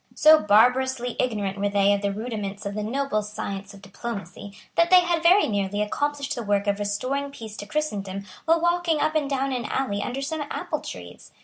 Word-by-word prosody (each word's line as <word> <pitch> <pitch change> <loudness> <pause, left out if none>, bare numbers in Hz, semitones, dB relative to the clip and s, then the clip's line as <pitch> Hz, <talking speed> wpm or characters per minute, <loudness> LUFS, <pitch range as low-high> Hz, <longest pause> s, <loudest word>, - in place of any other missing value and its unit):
So 310 0 +7
barbarously 245 +3 +3
ignorant 205 -5 -1
were 205 0 +1
they 200 0 +3
of 200 - -1
the 200 0 0
rudiments 210 -2 -5
of 200 - -3
the 210 - -3
noble 235 0 -1
science 200 -2 -6
of 200 - -16
diplomacy 200 -1 -7 0.2
that 335 0 +3
they 365 0 +8
had 345 -2 0
very 360 +5 +5
nearly 205 -1 -1
accomplished 290 +6 -1
the 240 - -4
work 205 -2 0
of 200 0 0
restoring 255 +8 -2
peace 225 -6 -9
to 205 - -7
Christendom 200 -8 -3 0.2
while 330 +1 +4
walking 345 -2 +1
up 310 +1 +1
and 300 -3 0
down 275 0 0
an 245 -2 -3
alley 210 -7 -1
under 260 +5 -3
some 315 +2 -3
apple - - -3
trees. - - -10
225 Hz, 200 wpm, -25 LUFS, 205-280 Hz, 0.2 s, they